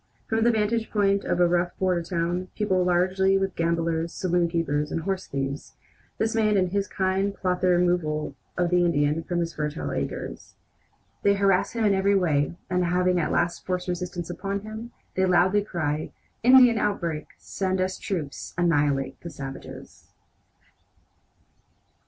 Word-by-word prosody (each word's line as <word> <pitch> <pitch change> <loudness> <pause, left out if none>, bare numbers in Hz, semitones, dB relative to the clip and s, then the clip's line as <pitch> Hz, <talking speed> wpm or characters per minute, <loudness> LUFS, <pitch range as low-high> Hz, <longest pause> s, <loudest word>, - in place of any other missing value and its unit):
From 225 0 +1
the 235 - +5
vantage 225 0 0
point 200 -1 +1
of 175 - 0
a 175 - +5
rough 175 0 0
border 185 -2 +1
town, 175 +1 -2
peopled 185 -4 +1
largely 190 +2 +3
with 195 -1 -1
gamblers, 165 0 0
saloonkeepers, 165 -5 0
and 165 - -2
horse 190 +1 -2
thieves, 135 0 -4 0.4
this 220 0 0
man 215 -2 +2
and 185 -1 +2
his 200 0 0
kind 195 +1 0
plot 180 -1 -1
the 185 - +3
removal 175 -5 +1 0.2
of 175 -1 +1
the 180 0 +4
Indian 150 -2 +1
from 175 0 -1
his 170 0 -3
fertile 150 +1 -3
acres. - - -5 0.7
They 200 0 +3
harass 195 -2 +2
him 230 -2 0
in 205 - +4
every 195 +1 +2
way, 155 -5 +1
and 180 -1 +1
having 180 +1 +2
at 160 - 0
last 175 0 0
forced 180 0 -3
resistance 175 -1 -4
upon 200 +2 -3
him, 220 +2 -7 0.2
they 190 - +2
loudly 185 +3 +3
cry: 155 -6 -2 0.3
"Indian 250 -2 +7
outbreak! 170 -8 -2
Send 190 -1 -2
us 185 0 -1
troops! 160 -8 -5
Annihilate 145 -6 +1
the 170 - -7
savages!" 135 -3 -9
180 Hz, 155 wpm, -25 LUFS, 170-195 Hz, 0.7 s, Indian